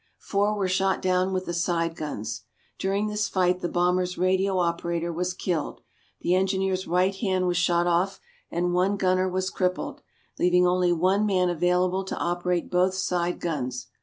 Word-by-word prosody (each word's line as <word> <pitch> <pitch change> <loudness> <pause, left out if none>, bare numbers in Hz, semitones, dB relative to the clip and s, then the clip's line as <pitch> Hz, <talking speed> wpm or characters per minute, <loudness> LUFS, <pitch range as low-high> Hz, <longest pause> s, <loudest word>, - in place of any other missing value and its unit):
Four 205 +1 0
were 195 -2 0
shot 190 +1 +1
down 185 0 +1
with 185 0 -2
the 175 - -3
side 170 -1 0
guns. 115 -9 -5 0.4
During 195 +2 0
this 210 0 -1
fight, 180 -1 +1
the 175 - -2
bomber's 180 +1 +1
radio 190 +1 +1
operator 170 -1 -1
was 180 +2 -2
killed, 175 -5 -3 0.4
the 175 - +1
engineer's 190 0 0
right 180 +3 +2
hand 190 -2 0
was 175 -1 +1
shot 175 0 +2
off, 175 +3 +1 0.3
and 175 0 -1
one 190 +3 +2
gunner 185 0 +2
was 185 +1 -2
crippled, 185 -1 -2 0.4
leaving 180 0 +4
only 180 0 +2
one 185 +5 +2
man 185 -3 +2
available 180 +2 +1
to - - -4
operate 175 0 -1
both 185 +1 +2
side 175 -2 -1
guns. 125 -6 -3
180 Hz, 165 wpm, -26 LUFS, 175-190 Hz, 0.4 s, leaving